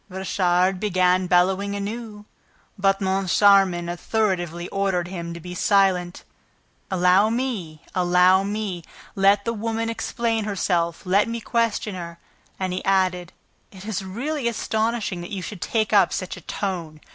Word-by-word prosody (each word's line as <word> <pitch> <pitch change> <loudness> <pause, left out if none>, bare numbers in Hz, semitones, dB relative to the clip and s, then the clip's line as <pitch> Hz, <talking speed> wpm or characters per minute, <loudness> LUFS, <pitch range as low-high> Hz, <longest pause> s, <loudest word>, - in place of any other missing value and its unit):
Richard 185 0 +1
began 185 -2 +2
bellowing 190 +3 +2
anew, 210 +1 -6 0.5
but 195 -1 +1
Moncharmin 190 -1 +3
authoritatively 175 -2 -1
ordered 190 -3 -1
him 170 -2 -6
to - - -7
be 180 +2 -8
silent. 185 -1 +1 0.7
"Allow 185 +3 +4
me! 220 - -3
Allow 180 +1 +4
me! 200 -3 -3 0.3
Let 200 +1 +3
the 230 - -1
woman 225 +1 -2
explain 230 -1 -2
herself. 175 -5 -1
Let 195 +4 +3
me 230 0 -3
question 230 -2 -1
her." 170 -2 -7 0.4
And 185 -1 -2
he 185 - -4
added: 185 -3 +1 0.4
"It 190 0 -12
is 210 -3 -3
really 250 +8 -3
astonishing 220 -4 -1
that 175 - -8
you 195 -3 -5
should 185 0 -7
take 220 -2 0
up 195 -4 +5
such 185 - -4
a - - -11
tone! 170 -6 -4
190 Hz, 140 wpm, -23 LUFS, 180-210 Hz, 0.7 s, up